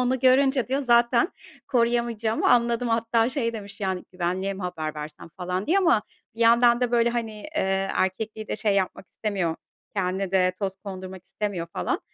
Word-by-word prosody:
onu 255 Hz, +1 st, +1 dB
görünce," 265 Hz, 0 st, +4 dB
diyor, 270 Hz, +2 st, 0 dB
"zaten 235 Hz, +3 st, +4 dB, 0.4 s
koruyamayacağımı 235 Hz, -3 st, +1 dB
anladım." 235 Hz, 0 st, +3 dB
Hatta 230 Hz, 0 st, +2 dB
şey 250 Hz, -4 st, -1 dB
demiş: 205 Hz, -2 st, -8 dB
"Yani 190 Hz, -2 st, -2 dB
güvenliğe 185 Hz, +2 st, -2 dB
mi 190 Hz, -, -7 dB
haber 160 Hz, -4 st, -3 dB
versem?" 150 Hz, +1 st, -8 dB
falan 180 Hz, +1 st, -3 dB
diye. 370 Hz, +5 st, +3 dB
Ama 335 Hz, -, +3 dB, 0.3 s
bir 230 Hz, -, -11 dB
yandan 235 Hz, +1 st, +5 dB
da 245 Hz, -1 st, +1 dB
böyle, 235 Hz, 0 st, +3 dB
hani, 230 Hz, -2 st, -2 dB
eee, 195 Hz, -6 st, -2 dB
erkekliği 215 Hz, +3 st, -2 dB
de -, -, -2 dB
şey 210 Hz, -3 st, +1 dB
yapmak 190 Hz, -1 st, -2 dB
istemiyor, 190 Hz, -6 st, -2 dB, 0.4 s
kendine 190 Hz, 0 st, -1 dB
de 185 Hz, -1 st, +3 dB
toz 195 Hz, -2 st, -2 dB
kondurmak 190 Hz, -2 st, -8 dB
istemiyor 200 Hz, -5 st, -3 dB
falan. -, -, -1 dB
215 Hz, 170 wpm, -25 LUFS, 190-235 Hz, 0.4 s, yandan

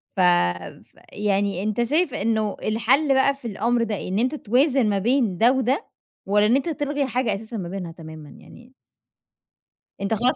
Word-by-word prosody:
ف -, -, -5 dB
فيعني 185 Hz, -, -1 dB
أنت 215 Hz, +3 st, 0 dB
شايف 300 Hz, +4 st, +1 dB
إنه 220 Hz, -2 st, -1 dB
الحل 250 Hz, +7 st, +2 dB
بقى 270 Hz, +1 st, +3 dB
في 260 Hz, -3 st, -9 dB
الأمر 230 Hz, +3 st, 0 dB
ده 220 Hz, -2 st, -2 dB
إيه؟ -, -, -6 dB
إن 195 Hz, -, -1 dB
أنت 255 Hz, +5 st, 0 dB
توازن 255 Hz, -1 st, +2 dB
ما 200 Hz, -, +1 dB
بين 230 Hz, -3 st, +1 dB
ده 235 Hz, +3 st, +5 dB
وده، 265 Hz, -, 0 dB, 0.4 s
والَّا 205 Hz, +1 st, +3 dB
إن 235 Hz, -, +3 dB
أنت 280 Hz, +5 st, 0 dB
تلغي 290 Hz, -2 st, -2 dB
حاجة 245 Hz, -4 st, -1 dB
أساسًا 220 Hz, +2 st, -7 dB
ما 175 Hz, -3 st, -5 dB
بينها 180 Hz, -2 st, -5 dB
تمامًا 160 Hz, -3 st, -11 dB
يعني؟ 245 Hz, +2 st, -16 dB, 1.3 s
أنت 200 Hz, +2 st, -1 dB
خلاص 245 Hz, +4 st, +2 dB
225 Hz, 175 wpm, -23 LUFS, 200-260 Hz, 1.3 s, ده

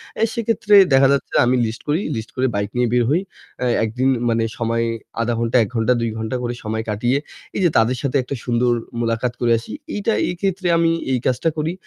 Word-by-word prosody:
অ্যা 225 Hz, -, +2 dB
সেক্ষেত্রে 220 Hz, -2 st, +2 dB, 0.2 s
দেখা 135 Hz, 0 st, +6 dB
যাচ্ছে 140 Hz, -, -2 dB
আমি 125 Hz, +1 st, +2 dB
লিস্ট 110 Hz, +1 st, -5 dB
করি, 155 Hz, +5 st, +1 dB
লিস্ট 110 Hz, 0 st, -5 dB
করে 130 Hz, 0 st, +1 dB
বাইক 100 Hz, 0 st, -1 dB
নিয়ে 125 Hz, -1 st, +2 dB
বের 125 Hz, -1 st, +3 dB
হই। 170 Hz, +5 st, +2 dB, 0.4 s
অ্যা 125 Hz, -, 0 dB, 0.2 s
একদিন 125 Hz, +4 st, 0 dB, 0.2 s
মানে 115 Hz, 0 st, +1 dB
সময় 115 Hz, 0 st, 0 dB, 0.4 s
০.৫ 120 Hz, +1 st, 0 dB
ঘণ্টা 115 Hz, +1 st, +1 dB
১ -, -, -5 dB
ঘণ্টা 115 Hz, +2 st, +2 dB
২ 115 Hz, -, 0 dB
ঘণ্টা 110 Hz, +3 st, -3 dB
করে 120 Hz, 0 st, -2 dB
সময় 110 Hz, +1 st, -2 dB
কাটিয়ে 120 Hz, +6 st, +1 dB, 0.4 s
এই -, -, -1 dB
যে 175 Hz, -, +5 dB
তাদের 120 Hz, +2 st, +2 dB
সাথে 140 Hz, 0 st, +1 dB
একটা 135 Hz, +1 st, -5 dB
সুন্দর 120 Hz, 0 st, +1 dB, 0.3 s
মুলাকাত 115 Hz, +1 st, -1 dB
করে 120 Hz, -, +2 dB
আসি। 115 Hz, -, -9 dB, 0.2 s
এইটা 210 Hz, +2 st, 0 dB, 0.2 s
এক্ষেত্রে 185 Hz, +1 st, -2 dB
আমি 165 Hz, 0 st, +3 dB, 0.2 s
এই 125 Hz, -, +1 dB
কাজটা 130 Hz, +6 st, +1 dB
করি। 155 Hz, +3 st, -1 dB
125 Hz, 205 wpm, -20 LUFS, 115-150 Hz, 0.4 s, দেখা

